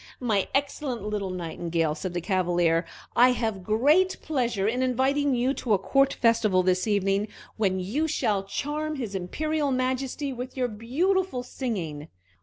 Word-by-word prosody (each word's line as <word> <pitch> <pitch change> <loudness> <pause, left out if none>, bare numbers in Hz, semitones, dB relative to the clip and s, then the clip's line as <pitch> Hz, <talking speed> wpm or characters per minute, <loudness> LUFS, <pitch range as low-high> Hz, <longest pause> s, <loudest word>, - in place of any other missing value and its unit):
"My 215 -6 +1
excellent 275 -4 -1
little 210 -2 -2
Nightingale," 170 -2 -2
said 175 +2 -5
the 175 - -1
Cavalier, 175 -2 +1 0.3
"I 250 +1 +6
have 220 -6 -2
great 295 - +3
pleasure 240 -9 0
in 245 +4 0
inviting 265 +2 +2
you 250 +3 +1
to 240 -5 -1
a - - +5
court 275 +8 +2
festival 215 -5 +3
this 185 +2 +1
evening, 200 0 +1 0.3
when 190 -4 +1
you 240 +13 -1
shall 210 -10 0
charm 295 +10 -3
his 235 -8 -4
Imperial 295 - -1
Majesty 260 +2 -1
with 255 +2 -7
your 250 -1 0
beautiful 270 - 0
singing." 175 - -4
230 Hz, 150 wpm, -26 LUFS, 190-270 Hz, 0.3 s, I